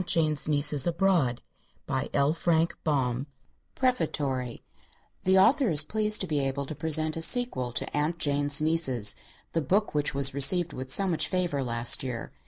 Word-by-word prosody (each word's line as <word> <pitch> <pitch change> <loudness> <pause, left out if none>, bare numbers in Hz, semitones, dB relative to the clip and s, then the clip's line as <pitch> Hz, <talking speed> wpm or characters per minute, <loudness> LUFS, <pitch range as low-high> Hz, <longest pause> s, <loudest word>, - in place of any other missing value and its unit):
SAFE 180 0 -3
HOME 155 -2 +1
345 150 +2 -1 2.8
PREFATORY: 145 - -2 0.6
The 190 +1 +3
author 245 +6 +3
is 155 -2 +5
pleased 215 +5 0
to - - -1
be 150 -3 -1
able 135 0 -3
to 145 - -7
present 155 +1 +1
a 165 - -5
sequel 165 - +2
to - - -3
"Aunt 150 +3 -1
Jane's 145 -2 +2
Nieces," 150 -9 +2 0.4
the 165 - -2
book 200 +9 -1
which 145 -2 -1
was 135 -1 +2
received 165 +6 +3
with 130 +1 -7
so 195 - +4
much 155 -4 -1
favor 175 -7 -2
last 115 -1 +2
year. 125 -3 -6
155 Hz, 145 wpm, -26 LUFS, 140-175 Hz, 2.8 s, is